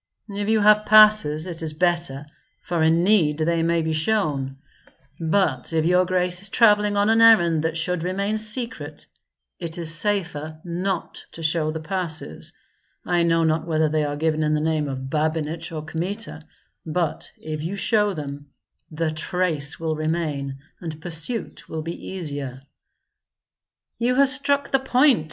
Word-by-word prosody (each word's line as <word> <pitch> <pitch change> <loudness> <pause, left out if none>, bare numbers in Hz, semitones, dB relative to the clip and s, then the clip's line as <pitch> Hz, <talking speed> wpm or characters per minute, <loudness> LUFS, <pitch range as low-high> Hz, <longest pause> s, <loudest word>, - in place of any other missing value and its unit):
"If 205 +1 -3
you 220 -1 +3
have 210 +1 +5
passes, 215 -8 +6
it 170 -3 -6
is 160 -1 -4
better, 170 -4 0 0.3
for 170 -2 -2
in 165 +2 +3
need 175 -7 +3
they 165 +1 +1
may 165 0 +1
be 160 0 -1
shown; 155 -7 0 0.6
but 160 -5 0
if 160 -1 +1
your 180 +1 +4
grace 180 -1 0
is 200 - -8
travelling 210 -3 +4
on 205 +2 +3
an 225 0 +4
errand 175 -9 +6
that 160 0 -1
should 170 +1 -1
remain 200 +5 -1
secret, 230 +3 -4 0.5
it 170 -1 -4
is 165 -2 -3
safer 165 -5 -1
not 180 +1 -3
to 165 - -8
show 155 0 +1
the 160 +1 -3
passes. 160 - -3 0.5
I 175 -1 +1
know 165 -1 +2
not 160 +1 0
whether 155 -1 +1
they 155 0 +1
are 145 0 -2
given 155 0 0
in 155 0 +1
the - - +1
name 155 -1 0
of 130 0 -5
Babinich 160 +1 -2
or 155 -2 -5
Kmita; 170 +1 -5 0.4
but 165 0 -2
if 155 -1 -6
you 170 +6 -3
show 210 0 +1
them, 145 -1 -7 0.4
the 160 0 -2
trace 155 -2 -1
will 160 -1 -1
remain 155 -4 -2 0.2
and 160 -3 -7
pursuit 175 +7 -5
will 160 -1 -4
be 165 +2 -7
easier." 145 -7 -5 1.4
"You 245 +2 +1
have 275 0 +5
struck 280 +1 +1
the 270 - +3
point!" 265 0 +4
165 Hz, 160 wpm, -23 LUFS, 155-200 Hz, 1.4 s, passes